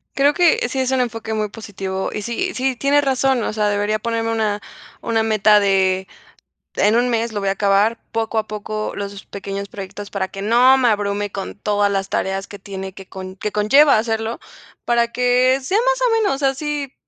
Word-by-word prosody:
Creo 285 +1 +4
que 345 -8 +3
sí 265 - -3
es 260 0 0
un 260 -1 +2
enfoque 225 -2 -3
muy 215 -1 -1
positivo, 195 -3 -5
y 210 - -4
sí 240 - -2
sí, 260 0 -1
tiene 280 +3 +2
razón. 265 -3 +1
O - - -2
sea, 210 -1 +1
debería 205 +1 0
ponerme 230 0 -2
una 215 -2 0 0.4
una 225 -1 0
meta 215 -1 +4
de, 190 -1 +2 0.7
en 210 +2 +3
1 245 +1 +2
mes 230 -1 -1
lo 205 - -2
voy 195 -1 -1
a - - +1
acabar, 200 +3 +2
poco 225 0 -2
a 215 - 0
poco, 215 0 -4
los 200 0 -6
pequeños 200 0 -6
proyectos 200 +1 -8
para 195 -2 -2
que 195 - -8
no 245 +5 +5
me 250 -2 +3
abrume 205 -1 -1
con 195 - -6
todas 205 -1 +1
las 195 -1 -2
tareas 195 +1 -2
que 205 - -10
tiene 190 -1 -7
que 195 -1 -12
con 185 0 -8
que 210 +2 -4
conlleva 270 +7 +5
hacerlo, 225 0 -2 0.5
para 235 -1 +2
que 250 +1 +3
sea 370 +10 0
más - - +1
o - - +1
menos 280 -9 0
así. 280 0 -1
220 Hz, 200 wpm, -20 LUFS, 200-250 Hz, 0.7 s, no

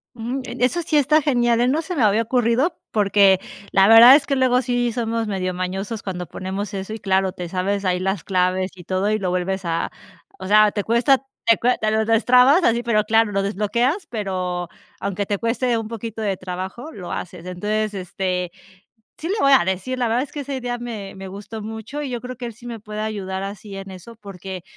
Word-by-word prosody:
Mm, 240 +3 -3
eh, - - -7
eso 255 +8 +2
sí 310 -2 +1
está 300 +2 +4
genial, 240 -5 +2
eh, 245 - +3
no 290 +5 +1
se 360 +2 -5
me 280 - 0
había 215 +1 +4
ocurrido 250 +7 +1 0.2
porque 200 -2 +4 0.3
la 195 0 +5
verdad 230 +4 +10
es 285 -1 +2
que 280 - 0
luego 255 -1 +3
sí 245 -1 0
somos 230 -1 -2
medio 185 -2 -2
mañosos 190 +5 -4
cuando 180 -3 -5
ponemos 190 +4 -5
eso 195 +2 -5
y 220 - -6
claro, 190 -1 +1
te 180 -1 -6
sabes 195 +2 -1
ahí 180 -1 +1
las 190 0 -2
claves 185 0 0
y 180 - -12
todo 190 +3 0
y 215 - +1
lo 190 -3 -1
vuelves 185 +1 -2
a, 165 0 -1 0.5
o - - -6
sea, 210 +1 +6
te 205 - -2
cuesta, 235 +5 +3 0.3
te 230 - +6
acuerdas, 250 +3 +1
te 215 - 0
lo 220 0 +1
destrabas 250 - +5
así, 235 -3 +3
pero 230 -3 +1
claro, 225 0 +2
lo 195 -1 0
desbloqueas, 235 - 0
pero 185 -5 -3 0.3
aunque 200 +1 -2
te 205 - 0
cueste 235 +2 0
un 225 -1 -4
poquito 225 0 -6
de 200 -3 -1
trabajo, 185 - -6
lo 185 - -8
haces. 180 -1 -6
Entonces, 210 +4 -2
este 185 -1 -3 0.7
sí 325 - -5
le 400 - +1
voy 275 - +4
a 260 - +5
decir 190 +8 -2
la 245 - +1
verdad 235 +3 +1
es 285 - -10
que 295 - -6
esa 280 0 -5
idea 245 -2 -3
me 225 -5 -6
me 190 0 -8
gustó 205 +3 -8
mucho 220 +7 -6
y 285 - -4
yo 240 -2 -4
creo 250 0 -7
que 245 - -6
él 235 - -6
sí 240 +3 -16
me 230 -2 -6
puede 210 0 -6
ayudar 195 -3 -4
así 200 0 -7
en 195 0 -8
eso 190 +5 -11
porque, 190 -3 -8
215 Hz, 225 wpm, -21 LUFS, 190-245 Hz, 0.7 s, verdad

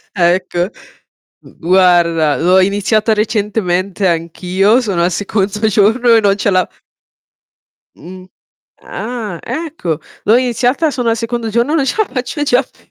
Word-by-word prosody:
Ecco. 175 0 0 0.8
Mhmm, - - -17
guarda 170 -3 +3
l'ho 180 +3 +3
iniziata 205 +3 +1
recentemente 205 -3 -1
anch'io, 180 +6 +1
sono 195 -7 -1
al 175 - +2
secondo 205 +3 -1
giorno 225 +3 +3
e 225 - +5
non 200 -1 +2
ce 205 - 0
la 185 -2 +1 1.3
Mh. 185 +3 -12 0.5
Ah, 220 -6 -6
ecco. 300 - -4 0.2
L'ho 220 +3 +4
iniziata, 250 +5 0
sono 245 -4 -1
al 225 - 0
secondo 230 0 -3
giorno, 235 +6 0
e - - +2
non 280 -4 +1
ce - - -1
la 435 -2 +1
faccio 265 +3 -3
già 255 -3 +2
più. - - -27
205 Hz, 145 wpm, -15 LUFS, 180-235 Hz, 1.3 s, e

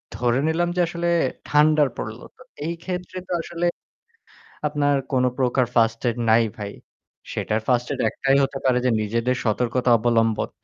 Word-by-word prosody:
ধরে 120 +1 +1
নিলাম 170 +2 +1
যে 180 - +2
আসলে 170 +1 -2 0.4
ঠান্ডার 150 0 +4
পড়ল 110 +2 -5 0.2
তো - - -20 0.2
এই 165 - -1
ক্ষেত্রে 180 0 -5
তো - - -10
আসলে 170 +1 -4 1.0
আপনার 145 -1 +1 0.2
কোন 130 -2 +2
প্রকার 130 -1 +2
ফার্স্ট 115 -1 +3
এইড 115 - -4
নাই 115 +1 +5
ভাই 105 -2 -5 0.6
সেটার 110 - -1
ফার্স্ট 125 -1 +2
এইড 135 - -6
একটাই 135 0 +2
হতে 135 0 -2
পারে 130 -1 +3
যে - - +4
নিজেদের 115 +4 0
সতর্কতা 125 +3 0
অবলম্বন। 115 -1 +1
125 Hz, 160 wpm, -23 LUFS, 115-155 Hz, 1.0 s, নাই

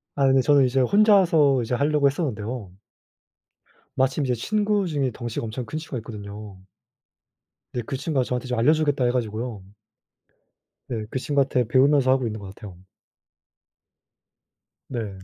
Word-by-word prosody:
아이, 135 -1 +3
그 135 - +4
저는 140 +1 +4
이제 130 +1 +1
혼자서 170 - +4
이제 115 - -4
하려고 145 +2 +1
했었는데요 120 - -3 1.2
마침 135 +3 +1
이제 125 - 0
친구중에 195 - 0
덩치가 120 -1 -5
엄청 115 +3 -5
큰 155 - -5
친구가 155 -4 -6
있거든요. 105 -2 -9 1.2
네, 120 - -2
그 135 - -4
친구가 140 -1 -1
저한테 125 +1 -3
좀 125 -1 -2
알려 125 +7 +4
주겠다 145 -4 0
해 120 - +2
가지고요 115 -2 -3 1.3
네, 110 -4 -4
그 130 - -3
친구한테 135 -3 0
배우면서 135 +2 +3
하고 130 -1 +2
있는 110 0 -5
것 95 -1 -9
같아요. 100 -4 -11 2.1
네. 115 -5 -4
130 Hz, 310 characters per minute, -24 LUFS, 115-145 Hz, 2.1 s, 그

